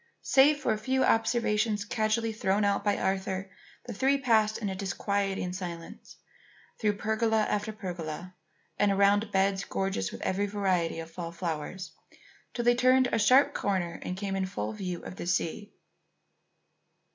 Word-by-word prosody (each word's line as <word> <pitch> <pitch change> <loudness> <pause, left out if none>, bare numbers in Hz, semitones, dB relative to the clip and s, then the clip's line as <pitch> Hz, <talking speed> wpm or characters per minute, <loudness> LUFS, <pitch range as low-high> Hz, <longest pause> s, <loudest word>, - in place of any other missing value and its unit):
Save 285 +2 +5
for 230 - +1
a 215 - -4
few 265 +3 +1
observations 215 -2 +1
casually 220 0 0
thrown 205 -1 +1
out 200 0 +1
by 205 -1 +1
Arthur, 190 0 -2 0.3
the 240 - -6
three 270 +7 +2
passed 220 -5 +2
in 215 - -3
a 190 - -2
disquieting 195 -1 -2
silence 175 -3 -8 0.6
through 210 -2 +1
pergola 220 +1 +1
after 210 +1 -1
pergola, 180 -4 -6 0.5
and 205 - +4
around 200 +2 +3
beds 195 0 +1
gorgeous 190 - -2
with - - -8
every 200 +2 0
variety 185 -5 0
of 165 0 -8
fall 170 0 -6
flowers, 170 +2 -5 0.6
till 240 - -2
they 240 - +6
turned 255 +1 +4
a 225 - +1
sharp 255 +6 +5
corner 185 -4 -1
and 180 - -4
came 195 0 -3
in 190 -1 -1
full 110 - -4
view 180 - -5
of 185 - -8
the - - -5
sea. 180 +3 -1
200 Hz, 155 wpm, -29 LUFS, 185-220 Hz, 0.6 s, they